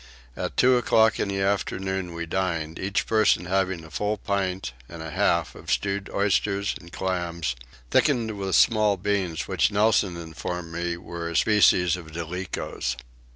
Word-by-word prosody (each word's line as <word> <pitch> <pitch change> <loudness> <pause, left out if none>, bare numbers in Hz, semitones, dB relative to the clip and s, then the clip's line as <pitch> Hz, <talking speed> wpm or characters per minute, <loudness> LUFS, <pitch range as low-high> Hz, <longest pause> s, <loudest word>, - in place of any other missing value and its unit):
At - - -4
two 125 0 +5
o'clock 110 -2 +3
in - - 0
the 100 0 -2
afternoon 95 -2 -1
we 85 0 -3
dined, 85 -3 -2
each 100 +1 -1
person 110 -5 +3
having 95 -2 0
a 80 - -14
full 105 +8 -1
pint 95 -7 -2 0.2
and 85 - -9
a 80 -1 -6
half 85 +1 +1
of - - -11
stewed 100 0 -1
oysters 100 0 +1
and 85 -1 -14
clams, 85 -7 -2 0.4
thickened 120 -6 +3
with 95 -3 -1
small 105 +1 +4
beans 95 -4 -1
which - - +2
Nelson 105 -3 +2
informed 85 +1 -5
me 85 0 -2
were 85 -1 -6
a 85 - -6
species 90 -2 +4
of 80 -3 -11
Dolichos. 85 -6 -4
95 Hz, 155 wpm, -25 LUFS, 85-100 Hz, 0.4 s, two